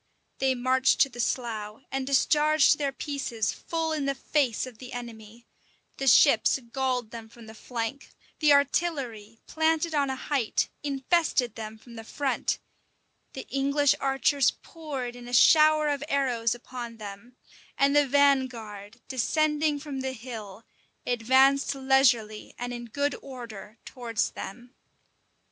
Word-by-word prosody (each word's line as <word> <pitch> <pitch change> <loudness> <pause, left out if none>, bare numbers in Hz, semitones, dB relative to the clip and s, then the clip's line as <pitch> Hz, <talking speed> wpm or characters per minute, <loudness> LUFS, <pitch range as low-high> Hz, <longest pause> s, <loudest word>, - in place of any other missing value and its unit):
They 265 -1 +2
marched 260 +1 +2
to 275 - +5
the 245 -2 -12
slough, 225 -2 -3
and 270 -1 -3
discharged 300 +2 +3
their 280 -2 0
pieces 270 -6 -3
full 325 -1 -3
in 300 -3 -2
the 275 0 0
face 265 -4 0
of 250 -4 -12
the 255 0 -10
enemy: 230 -1 -9 0.5
the 270 - -3
ships 250 -1 +5
galled 255 -4 -1
them 230 -1 -9
from 235 0 -14
the 220 - -11
flank: 235 +4 -5 0.3
the 300 -2 +4
artillery, 275 -7 0
planted 320 +1 0
on 285 -2 +1
a 265 - -2
height, 260 -3 -1
infested 280 - 0
them 220 -1 -7
from 235 +1 -14
the 225 - -7
front: 275 +4 -2 0.8
the 265 - -8
English 280 +1 +2
archers 270 0 +2
poured 275 -7 -7
in 245 0 -11
a 245 - -8
shower 305 +2 +6
of 290 -1 -1
arrows 245 -5 +1
upon 240 -1 -8
them: 210 +3 -10 0.4
and 280 +1 +3
the 290 -1 +4
vanguard, 245 -6 0
descending 300 +3 +1
from 280 -2 -6
the 265 0 -3
hill, 225 -4 -9 0.4
advanced 265 +4 +3
leisurely 265 -5 +2
and 245 0 -4
in 240 0 -6
good 285 +5 -1
order 235 -5 -10
towards 235 -4 -2
them. 245 +5 -9
260 Hz, 140 wpm, -27 LUFS, 230-280 Hz, 0.8 s, shower